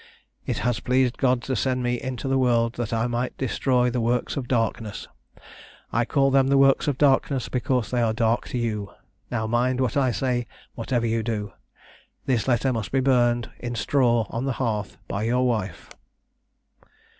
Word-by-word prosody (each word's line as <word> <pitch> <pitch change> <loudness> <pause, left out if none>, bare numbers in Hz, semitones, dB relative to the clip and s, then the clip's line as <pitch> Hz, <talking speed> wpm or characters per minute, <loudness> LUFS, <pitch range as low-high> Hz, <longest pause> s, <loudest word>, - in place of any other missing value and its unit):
It - - -1
has 125 -2 +1
pleased 125 -1 +1
God 125 -3 +2
to 130 - -2
send 125 +3 0
me 120 0 -1
into 130 0 -4
the 135 0 +2
world 120 -2 +2
that 120 -2 -4
I 115 0 0
might 120 +1 -2
destroy 125 -1 +1
the 125 0 -1
works 120 +1 0
of 130 -3 -4
darkness; 115 -3 -2 0.9
I 115 +1 +2
call 135 +1 +2
them 135 0 +4
the 140 0 +3
works 135 +1 +4
of 145 -3 0
darkness 135 -1 +2
because 125 -2 -1
they 125 -1 +1
are 115 -1 +2
dark 115 +1 0
to - - -4
you 105 -4 -2 0.4
now 110 - -2
mind 120 +3 +1
what 130 -4 0
I 135 -3 +3
say 120 -1 -1 0.3
whatever 120 0 -1
you 115 0 0
do. 105 -3 -3 0.7
This 125 -3 0
letter 130 +1 +2
must 110 -3 -4
be 135 - +2
burned 120 -3 +2
in 120 0 -4
straw 120 -1 +2
on 120 +3 -3
the 135 - 0
hearth 110 -5 -2
by 100 - -3
your 125 +3 +1
wife." 105 -8 -2
120 Hz, 180 wpm, -24 LUFS, 115-130 Hz, 0.9 s, them